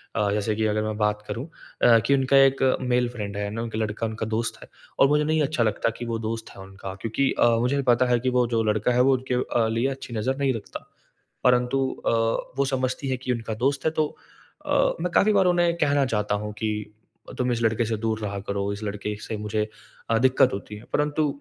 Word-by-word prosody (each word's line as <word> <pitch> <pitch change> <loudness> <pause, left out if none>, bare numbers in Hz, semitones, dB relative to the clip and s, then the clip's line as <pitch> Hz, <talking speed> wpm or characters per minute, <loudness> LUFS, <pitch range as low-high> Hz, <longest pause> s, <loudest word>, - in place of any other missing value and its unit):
अ, 105 -2 +1
जैसे 105 +1 0
कि 110 0 0
अगर 105 0 +1
मैं 110 0 -2
बात 105 0 0
करूँ 120 +5 -4 0.4
अ, 115 -1 +7
कि 140 - +4
उनका 135 +1 +3
एक 135 0 +5 0.2
मेल 125 -1 +1
फ्रेंड 105 -4 -6
है, 105 - -2
है 100 - -2
ना? 115 +3 -4
क 115 - -7
लड़का 110 +1 -2
उनका 110 0 -4
दोस्त 110 +1 -2
है - - -15 0.3
और 135 - +7
मुझे 150 +1 +3
नहीं 155 +1 +1
अच्छा 140 -4 +1
लगता 110 +1 +1
कि 120 - -5
वो 115 -1 -2
दोस्त 115 0 -4
है - - -10
उनका 95 0 -8
क्योंकि 115 +4 0
अ, - - +6
मुझे 135 +4 +1
पता 120 +1 +3
है 120 -1 +2
कि 130 - 0
वो 125 - +4
जो 115 -1 +2
लड़का 110 +2 +1
है 125 - +4
वो - - +5
उनके 130 0 -2
अ, 120 -2 +1
लिए 115 +4 0
अच्छी 135 -3 -7
नज़र 130 +5 -1
नहीं 135 -2 +1
रखता। 110 -3 -8 0.6
परन्तु 125 +1 +3 0.3
अ, - - +4 0.5
वो 140 - +2
समझती 130 +1 -2
है 130 - +1
कि 130 0 -3
उनका 115 -2 -3
दोस्त 135 0 +1
है 160 - +3
तो 155 -1 +1 0.6
अ, - - -4 0.3
मैं 180 - -1
काफ़ी 210 +4 +4
बार 195 -2 +4
उन्हें 175 -1 +3
कहना 145 -2 +2
चाहता 105 -4 0
हूँ 105 - -4
कि, 105 -1 -3 0.4
"तुम 125 -1 0
इस 115 - -1
लड़के 115 +1 +1
से 110 0 -2
दूर 110 0 -2
रहा 100 -2 -4
करो, 100 0 -1
इस 105 +2 -7
लड़के 105 0 -3
से 110 - -5
मुझे 105 0 -2 0.4
अ, 115 - +3
दिक्कत 130 0 +4
होती 100 +1 -6
है।" 105 - -11
परन्तु 150 +1 +1
115 Hz, 235 wpm, -25 LUFS, 105-130 Hz, 0.6 s, अ